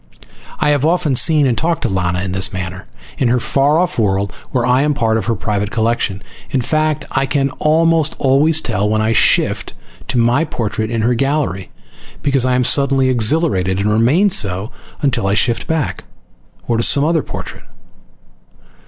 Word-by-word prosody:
I 150 - +1
have 145 -2 +1
often 160 -2 +1
seen 150 +3 +4
and 125 -3 +1
talked 165 +5 -1
to - - +1
Lana 90 -2 -1
in 95 - -4
this 95 +3 +1
manner, 95 0 -6 0.3
in 130 - +2
her 125 +1 +2
far 140 +5 +1
off 175 -6 -1
world, 100 -3 0 0.2
where 125 -3 -1
I 125 +1 +2
am 150 0 0
part 115 -4 0
of 110 -4 -1
her 115 - +1
private 105 0 -2
collection. 110 -3 -1 0.3
In 135 - 0
fact, 155 +4 -1
I 135 - 0
can 135 0 0
almost 160 0 +2
always 150 +4 +2
tell 100 -4 -1
when 110 0 +1
I 110 +1 +1
shift - - +1 0.3
to 135 - -2
my 120 +6 +2
portrait 110 -7 -3
in 115 -1 -2
her 120 +2 +2
gallery, 135 - -2 0.5
because 135 -3 +2
I 130 0 +1
am 125 - +1
suddenly 135 0 +2
exhilarated 115 - +1
and 100 +2 0
remain 145 - +3
so 100 - 0 0.3
until 130 -8 +1
I 100 - +1
shift 115 +2 0
back, 160 -4 -2 0.6
or 115 - 0
to - - +1
some 140 +3 +3
other 165 0 +1
portrait. - - -9
125 Hz, 180 wpm, -16 LUFS, 105-145 Hz, 0.6 s, seen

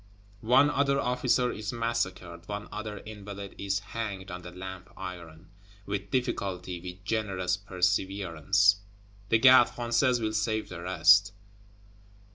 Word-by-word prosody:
One 145 +4 +6
other 140 -1 +2
officer 125 0 +1
is 105 0 -5
massacred; 95 -7 -3
one 105 0 -5
other 105 0 -5
Invalide 100 -2 -8
is 100 0 -1 0.2
hanged 100 -5 -4
on 90 0 -6
the 90 - -9
Lamp 95 0 -8
iron; 85 -1 -9 0.3
with 100 0 -4
difficulty, 95 -8 -2
with 90 +1 -9
generous 95 -5 -1
perseverance, 95 0 +1 0.5
the 115 - +5
Gardes 125 0 +7
Françaises 120 +1 +1
will 110 -1 -2
save 110 -2 -1
the 85 - -7
rest. 95 +3 +5
100 Hz, 125 wpm, -28 LUFS, 90-115 Hz, 0.5 s, Gardes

